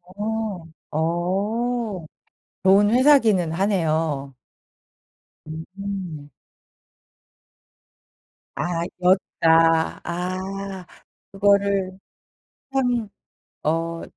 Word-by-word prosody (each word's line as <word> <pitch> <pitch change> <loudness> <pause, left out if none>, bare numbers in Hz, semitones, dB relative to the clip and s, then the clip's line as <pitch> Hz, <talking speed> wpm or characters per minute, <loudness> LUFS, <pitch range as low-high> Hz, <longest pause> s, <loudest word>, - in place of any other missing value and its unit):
어. 210 -4 -3 0.3
어. 195 +6 -1 0.6
좋은 195 +2 +5
회사기는 230 - +4
하네요. 160 -7 0 1.1
음. 175 -1 -6 2.3
아 170 -1 -1 0.2
였다. 165 -3 +3
아. 185 +2 -4 0.5
그거를 200 -1 +2 0.8
참 245 -5 +1 0.5
어 165 +1 -1
190 Hz, 90 characters per minute, -23 LUFS, 165-205 Hz, 2.3 s, 좋은